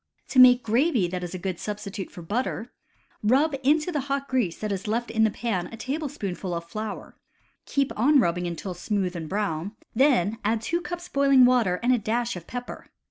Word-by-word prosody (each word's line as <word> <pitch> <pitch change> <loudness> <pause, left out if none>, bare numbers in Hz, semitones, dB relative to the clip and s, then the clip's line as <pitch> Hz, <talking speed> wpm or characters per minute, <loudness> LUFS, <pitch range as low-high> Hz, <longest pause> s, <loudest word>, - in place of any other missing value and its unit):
To 260 - +3
make 250 -1 +8
gravy 235 - +2
that 180 0 -4
is 175 +1 -5
a - - -3
good 185 -1 -4
substitute 205 -2 -5
for 175 - -10
butter, 230 +4 -3 0.5
rub 275 +8 +3
into 305 +5 +2
the 300 - -1
hot 275 0 -1
grease 245 -10 0
that 215 -1 -3
is 195 +1 -3
left 235 +3 -1
in 220 0 +3
the - - +3
pan 205 -5 -2
a 230 - -10
table 285 +5 -3
spoonful 185 -5 -4
of 170 0 -5
flour, 215 +4 -6 0.5
keep 280 -1 0
on 280 +6 +4
rubbing 175 -5 +1
until 175 +2 -5
smooth 185 0 -2
and 160 -2 -5
brown, 200 -1 -2 0.2
then 230 -5 +3
add 220 +2 +1
two 340 +8 -1
cups 350 0 -6
boiling 275 -2 +5
water 230 -8 +3
and 250 +1 +4
a 245 - +2
dash 235 +2 -1
of 175 -2 -9
pepper. 245 0 -7
220 Hz, 200 wpm, -26 LUFS, 185-260 Hz, 0.5 s, make